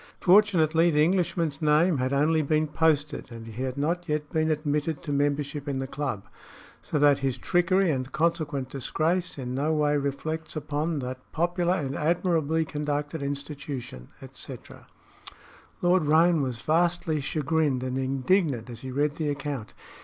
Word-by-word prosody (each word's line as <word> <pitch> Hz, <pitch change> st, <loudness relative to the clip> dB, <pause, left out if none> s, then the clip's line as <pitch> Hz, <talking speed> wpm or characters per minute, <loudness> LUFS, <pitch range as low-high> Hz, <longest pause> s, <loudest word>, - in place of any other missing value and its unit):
Fortunately, 175 Hz, -4 st, +4 dB
the 150 Hz, -2 st, +3 dB
Englishman's 170 Hz, -4 st, 0 dB
name 155 Hz, +1 st, +3 dB
had 130 Hz, +1 st, 0 dB
only 155 Hz, +3 st, +3 dB
been 155 Hz, +1 st, +1 dB
posted 150 Hz, -3 st, 0 dB
and 115 Hz, -1 st, -9 dB
he 115 Hz, +2 st, -7 dB
had 130 Hz, 0 st, -3 dB
not 170 Hz, +4 st, -1 dB
yet 150 Hz, 0 st, -2 dB
been 155 Hz, 0 st, +1 dB
admitted 150 Hz, 0 st, -1 dB
to 150 Hz, -, -4 dB
membership 145 Hz, 0 st, -1 dB
in 140 Hz, -2 st, -1 dB
the 135 Hz, -, -2 dB
club, 135 Hz, -7 st, -4 dB, 0.6 s
so -, -, -3 dB
that 145 Hz, -1 st, +5 dB
his 135 Hz, -2 st, -1 dB
trickery 175 Hz, +5 st, +2 dB
and 130 Hz, -2 st, -3 dB
consequent 155 Hz, -4 st, -1 dB
disgrace 160 Hz, +7 st, -1 dB
in 125 Hz, -2 st, -4 dB
no 145 Hz, +4 st, 0 dB
way 150 Hz, -1 st, +2 dB
reflects 155 Hz, +4 st, -3 dB
upon 155 Hz, +2 st, -2 dB
that 130 Hz, -1 st, -4 dB
popular 175 Hz, +2 st, +1 dB
and 140 Hz, -6 st, -3 dB
admirably 160 Hz, -1 st, +1 dB
conducted 150 Hz, 0 st, -3 dB
institution, 140 Hz, -, -5 dB, 0.2 s
etc." -, -, -10 dB, 1.0 s
Lord 175 Hz, -2 st, +3 dB
Roane 165 Hz, +1 st, +4 dB
was 130 Hz, -2 st, -3 dB
vastly 165 Hz, -1 st, +1 dB
chagrined 150 Hz, -3 st, 0 dB
and 130 Hz, 0 st, -2 dB
indignant 135 Hz, -, 0 dB
as 115 Hz, -, -8 dB
he 130 Hz, -, -7 dB
read 145 Hz, +3 st, 0 dB
the 155 Hz, -2 st, -1 dB
account. 140 Hz, -5 st, -4 dB
150 Hz, 155 wpm, -27 LUFS, 140-160 Hz, 1.0 s, that